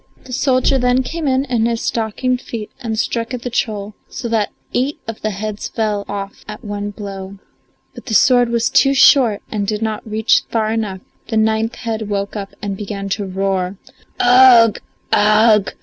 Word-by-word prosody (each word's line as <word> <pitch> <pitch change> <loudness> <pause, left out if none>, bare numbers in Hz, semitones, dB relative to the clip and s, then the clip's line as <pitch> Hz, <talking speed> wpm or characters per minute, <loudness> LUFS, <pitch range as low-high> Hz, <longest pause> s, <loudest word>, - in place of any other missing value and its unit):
The 255 - -10
soldier 260 +1 +2
then 250 +1 +2
came 320 +3 -4
in 265 0 +1
in 235 -4 +1
his 230 -1 -1
stockinged 245 +3 -1
feet 220 -3 -7
and 225 -3 -4
struck 230 +2 -2
at 245 - -8
the 245 - -4
troll, 210 -3 -2 0.2
so 240 - -5
that 220 -2 +1 0.2
eight 265 +4 -1
of 225 -1 -6
the 215 - -1
heads 210 +1 -4
fell 210 -2 -2
off 200 -1 -6
at 210 0 -8
one 205 0 -4
blow. 200 -1 -8 0.6
But - - -12
the 220 - -1
sword 245 +2 +5
was 235 0 0
too 275 0 +4
short 255 -6 +5
and 205 -2 -2
did 215 +1 -2
not 220 -1 -2
reach 220 +1 +3
far 220 -1 0
enough; 210 -4 -3 0.3
the 225 - -1
ninth 220 +1 +1
head 220 -3 -4
woke 200 0 -2
up 200 -2 -5
and 200 -1 -2
began 200 0 -5
to 200 0 -2
roar. 190 0 -2 0.4
"Ugh! 245 -3 +6 0.3
Ugh! 215 0 +4
220 Hz, 180 wpm, -18 LUFS, 205-245 Hz, 0.6 s, Ugh